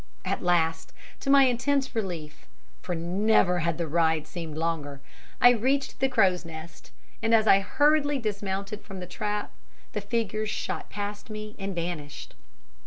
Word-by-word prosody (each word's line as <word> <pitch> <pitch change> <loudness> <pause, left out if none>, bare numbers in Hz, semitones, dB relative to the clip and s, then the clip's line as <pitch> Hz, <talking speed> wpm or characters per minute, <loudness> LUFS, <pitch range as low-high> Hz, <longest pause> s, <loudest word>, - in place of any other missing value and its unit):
At - - -1
last, 165 -2 +1 0.3
to - - -4
my 275 0 +8
intense 265 +2 +1
relief 175 -9 -5 0.3
for 180 - -3
never 180 +2 +2
had 170 -1 0
the 170 - -1
ride 160 0 +2
seemed 165 -3 -6
longer 155 -4 -2 0.4
I 245 - +8
reached 265 +4 0
the 265 - +2
Crow's 195 -8 +3
Nest, 165 0 -10 0.3
and 225 +1 +4
as 220 -1 +4
I 195 -2 +7
hurriedly 290 +6 +2
dismounted 205 -2 -3
from 195 -2 -9
the 180 - -5
trap, 210 +3 -3 0.4
the 210 - -2
figures 215 0 -1
shot - - -4
past 205 +1 -5
me 215 0 -7
and 195 -1 -4
vanished. 165 -4 -5
195 Hz, 155 wpm, -27 LUFS, 170-225 Hz, 0.4 s, my